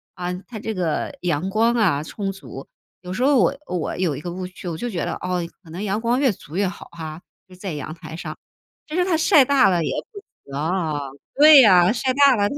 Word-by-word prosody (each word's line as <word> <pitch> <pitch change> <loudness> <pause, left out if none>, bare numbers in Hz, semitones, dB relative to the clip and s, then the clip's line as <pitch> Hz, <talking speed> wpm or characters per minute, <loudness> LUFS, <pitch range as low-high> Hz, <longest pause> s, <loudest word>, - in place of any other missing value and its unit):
啊， 180 -1 -3 0.2
它 220 - -7
这 220 +1 -4
个 180 - -2
阳 175 +1 -1
光 225 +4 +2
啊 175 -11 +2
充 195 +4 -4
足。 195 - -10 0.3
有 180 0 -6
时 250 - -1
候 280 +1 +4
我 280 - +3
我 180 -3 -3
有 175 -5 0
一 - - -7
个 175 - -5
误 185 +1 -5
区， 180 0 -10
我 170 - -3
就 240 +7 -3
觉 180 -6 -3
得 - - -2
哦， 180 0 -2 0.2
可 165 - -16
能 175 +5 -7
阳 210 +1 -1
光 240 +2 +1
越 275 -2 +3
足 165 -4 -11
越 200 -1 +2
好 180 - -8
哈， 160 0 -8 0.3
就 185 - -17
在 185 -1 -6
阳 150 +1 -6
台 165 -1 -10
上， 170 - -6 0.5
其 310 - -6
是 360 0 +2
它 365 -3 +1
晒 310 -3 +5
大 270 -3 +4
了 175 -3 +1
也 - - -2 0.2
不 415 - -9
行。 405 - -22 1.1
对 295 -1 +9
啊， 180 -3 +6
晒 255 +2 0
大 280 -1 +5
了 205 -1 +1
它 - - -5
195 Hz, 255 characters per minute, -22 LUFS, 175-250 Hz, 1.1 s, 对